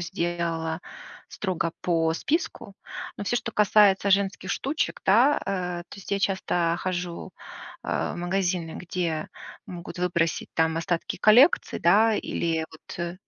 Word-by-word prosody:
сделала 170 -1 -2 0.5
строго 180 -4 -2
по 165 -2 +1
списку, 285 - -2 0.4
но 205 - -5
всё, 240 - +1
что 230 0 -3
касается 205 -1 +4
женских 195 -1 +1
штучек, 280 +9 -2
да, 245 +9 +5
э, 180 -3 -2
то - - -11
есть 195 - -10
я 200 - +2
часто 175 -4 0
хожу, 180 -2 -4 0.5
а, - - -1
в - - -8
магазины, 175 -2 -1
где 170 -3 -3 0.4
могут 175 0 -8
выбросить 170 -2 0
там 160 0 +2
остатки 165 0 -2
коллекций, 245 +9 +5
да, 220 +2 +5
или 165 -5 -1
вот, 170 +2 -6
180 Hz, 130 wpm, -26 LUFS, 170-200 Hz, 0.5 s, да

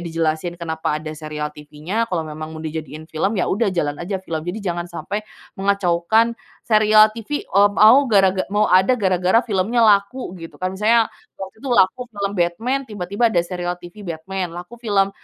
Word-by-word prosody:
dijelasin 165 0 -2
kenapa 160 -2 -5 0.2
ada 155 - -5
serial 150 -1 -5
TVnya, 150 +9 -4
kalau 175 -7 -2
memang 155 0 -7
mau 160 - -7
dijadiin 155 0 -7
film, 180 +7 -1
ya, 185 - 0
udah 220 +4 +1
jalan 145 -3 -1
aja 190 +2 -4
film. 165 -3 -3
Jadi 200 +4 -4
jangan 175 -2 -3
sampai, 175 +4 -5 0.4
mengacaukan 200 +3 +2 0.3
serial 215 -1 +5
TV, 230 +6 -4
eee, 200 +1 +5
mau 220 +5 +7
garaga 195 -4 +3
mau 210 +2 +1
ada 190 +7 +5
gara-gara 190 0 +2
filmnya 220 +2 +1
laku 210 +1 +2
gitu, 165 -1 -10
kan. 185 0 -3
Misalnya, 225 +2 +3 0.2
waktu 190 +1 -9
itu 270 - -7
laku 235 -2 +3
film 200 -3 -4
Batman 220 +11 0
tiba-tiba 205 +2 -1
ada 180 -7 +2
serial 175 0 -4
TV 180 +3 -12
Batman, 175 +2 -4
laku 180 +7 -9
film 205 -4 +1
190 Hz, 175 wpm, -20 LUFS, 170-215 Hz, 0.4 s, mau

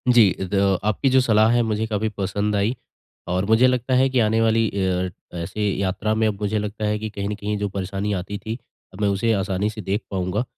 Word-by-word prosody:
जी। 110 -6 +6 0.2
ज 100 -1 +3
आपकी 110 +6 +1
जो 130 0 +5
सलाह 110 -3 +4
है 120 - +3
मुझे 110 +1 0
काफ़ी 110 0 -1
पसंद 100 +2 -1
आई। 105 +5 +1 0.5
और 90 +2 0
मुझे 110 +4 +5
लगता 125 0 0
है 130 +1 +4
कि 130 -1 +1
आने 110 0 +2
वाली 115 0 +3
अ, 95 -2 -1 0.3
ऐसे 85 +5 -4 0.2
यात्रा 100 +2 -1
में 110 0 +2
अब 105 -1 -3
मुझे 105 +1 0
लगता 105 +1 -4
है 105 0 0
कि 110 0 -4
कहीं 100 -1 -4
न 105 - -2
कहीं 105 +1 -3
जो 100 0 -2
परेशानी 100 +1 -3
आती 100 +3 -5
थी 110 +3 -5 0.4
अब 95 - -9
मैं 105 - +3
उसे 115 +4 +1
आसानी 100 0 0
से 110 0 -7
देख 100 +3 -1
पाऊँगा। 95 +3 -1
105 Hz, 225 wpm, -22 LUFS, 100-110 Hz, 0.5 s, जी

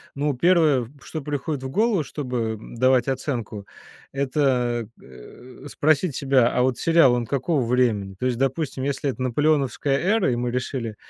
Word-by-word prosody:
Ну, 145 +1 0
первое, 150 -5 +3
что 155 +1 -6
приходит 145 0 -4
в 130 - -4
голову, 210 - +1
чтобы 125 -7 -3
давать 130 +2 +1
оценку- 120 -6 -4 0.4
это, 130 -4 0
э, 65 - -14
спросить 155 +1 +1
себя: 130 -3 +3
"А 125 - +2
вот 130 -1 0
сериал, 165 -6 +4
он 120 -1 -1
какого 140 +2 -1
времени?" 115 -6 0
То - - -2
есть, 125 -2 0
допустим, 135 0 -2
если 140 0 -1
это 130 - -5
наполеоновская 140 +1 +1
эра, 195 - +1
и - - 0
мы 120 0 -2
решили 125 -3 -3
130 Hz, 155 wpm, -23 LUFS, 120-145 Hz, 0.4 s, сериал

